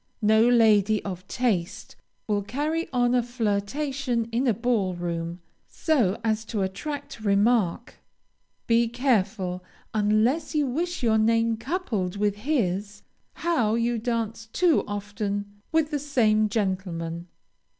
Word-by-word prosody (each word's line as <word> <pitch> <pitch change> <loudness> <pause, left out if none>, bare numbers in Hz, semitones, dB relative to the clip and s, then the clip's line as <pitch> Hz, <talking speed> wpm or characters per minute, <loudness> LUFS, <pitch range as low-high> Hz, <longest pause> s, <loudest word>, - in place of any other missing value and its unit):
No 220 +3 +5
lady 215 -3 +4
of 185 -1 -6
taste 205 -7 -2 0.3
will 205 -2 0
carry 300 +10 -2
on 245 -1 +2
a 250 - +4
flirtation 240 +3 -1
in 245 +4 0
a 235 - +4
ball 220 -5 0
room, 170 0 -4 0.3
so 240 - +1
as 220 -1 0
to 210 -3 -2
attract 285 +9 -5
remark. 210 0 +1 0.7
Be 235 0 +3
careful, 210 -7 0 0.3
unless 215 +10 +1
you 300 -1 +2
wish 330 +4 -2
your 220 -2 +3
name 230 +1 +2
coupled 225 - -2
with 205 0 0
his, 205 - -1 0.4
how 245 -11 +2
you 235 0 0
dance 225 -1 -3
too 335 +7 +2
often 205 0 -4
with 320 -1 +1
the 295 - 0
same 220 -7 +2
gentleman. 180 -5 -2
220 Hz, 125 wpm, -25 LUFS, 200-250 Hz, 0.7 s, No